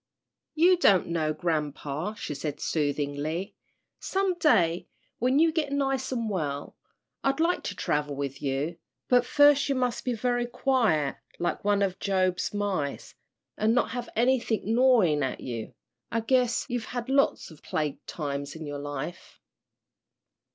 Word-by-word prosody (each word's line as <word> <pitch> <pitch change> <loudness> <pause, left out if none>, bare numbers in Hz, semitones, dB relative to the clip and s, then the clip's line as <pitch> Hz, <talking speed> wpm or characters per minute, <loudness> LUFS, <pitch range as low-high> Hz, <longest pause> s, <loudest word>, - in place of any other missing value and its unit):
"You 355 +3 +5
don't 195 - +4
know, 160 -2 0
grampa," 155 +2 -2
she 150 - -4
said, 145 +1 -4
soothingly. 150 +4 -2 0.5
"Some 385 -1 0
day 180 - +3 0.3
when 255 +3 +2
you 325 +1 +5
get 310 -3 -1
nice 270 -2 0
and 235 -3 -1
well, 150 -8 -3 0.5
I'd 275 +2 +1
like 340 +2 +2
to 200 - -3
travel 145 -4 -1
with 140 -1 -4
you, 145 +4 -2 0.3
but 245 -1 +4
first 290 -1 +5
you 275 - +2
must 250 -2 -1
be 250 - -1
very 245 +1 0
quiet 230 - +1 0.2
like 175 - -2
one 205 0 +2
of 190 -2 -1
Job's 185 -2 0
mice, 195 -9 -2 0.5
an' 220 +2 +3
not - - +2
have 245 -2 -4
anythin' 235 -2 +1
gnawin' 230 - +4
at 130 -2 -2
you 115 -3 -6 0.4
I 230 - 0
guess 245 0 +2
you've 245 -3 -3
had 245 -1 -5
lots 275 -8 +1
of 155 - -15
plague 150 -2 -3
times 140 -2 -4
in 160 -1 -7
your 145 -1 -5
life." 145 +4 -6
200 Hz, 150 wpm, -27 LUFS, -, 0.5 s, You